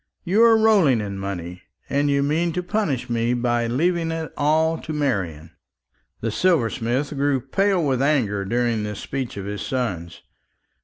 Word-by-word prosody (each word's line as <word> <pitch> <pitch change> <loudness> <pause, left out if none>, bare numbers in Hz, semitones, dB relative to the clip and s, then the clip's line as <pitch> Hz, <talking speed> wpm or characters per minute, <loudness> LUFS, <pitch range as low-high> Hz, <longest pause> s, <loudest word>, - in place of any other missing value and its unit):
You 195 +6 +2
are 230 -1 +7
rolling 200 - +4
in 100 -2 -4
money, 90 -2 -5 0.3
and 145 +1 +1
you 140 0 +2
mean 160 +4 0
to 180 +1 -2
punish 175 - -1
me 120 0 0
by 120 -1 0
leaving 165 +7 0
it 165 -1 -4
all 160 +2 +2
to 155 - -6
Marian." 95 - -2 0.7
The 115 - -1
silversmith 130 - +1
grew 140 -1 +1
pale 185 +7 +1
with 130 -2 +1
anger 120 -9 +1
during 120 +1 0
this 105 -1 -4
speech 130 -5 -5
of 100 - -5
his 105 0 -5
son's. 95 -10 -4
130 Hz, 160 wpm, -22 LUFS, 115-160 Hz, 0.7 s, are